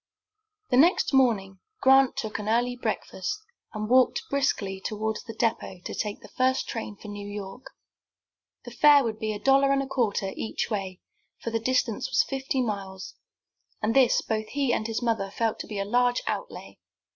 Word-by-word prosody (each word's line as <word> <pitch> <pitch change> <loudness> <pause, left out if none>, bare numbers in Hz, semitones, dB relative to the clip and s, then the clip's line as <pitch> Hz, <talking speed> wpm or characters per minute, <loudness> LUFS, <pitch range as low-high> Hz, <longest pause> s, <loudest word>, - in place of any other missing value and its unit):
The 250 - +4
next 325 +2 +4
morning 210 -8 +2 0.2
Grant 265 -2 +5
took 220 -2 -3
an 210 0 -4
early 245 +2 +1
breakfast, 255 +10 -3 0.3
and 215 -1 -4
walked 260 - +4
briskly 200 -9 0
toward 220 0 -2
the 225 - -7
depot 220 -5 -1
to - - -4
take 210 -1 -3
the - - -12
first 260 +1 +1
train 220 -2 -5
for 210 - -12
New 205 -1 -7
York. 205 +3 -7 1.0
The 240 - -8
fare 285 +3 +6
would 220 -2 -3
be 215 0 -2
a 210 - -3
dollar 275 +3 +4
and 275 0 +2
a - - -7
quarter 225 -7 0
each 225 - -3
way, 190 -3 -3 0.4
for 230 - -3
the 225 - 0
distance 235 -2 0
was - - +3
fifty 265 -1 -2
miles, 195 -4 -5 0.7
and 220 +1 0
this 260 -3 +4
both 215 -1 -2
he 275 -1 0
and 220 - -1
his 225 +1 -3
mother 220 -4 0
felt 225 +2 -1
to - - -6
be 210 - -6
a 200 - -1
large 245 +3 +2
outlay. - - -5
225 Hz, 180 wpm, -26 LUFS, 210-260 Hz, 1.0 s, fare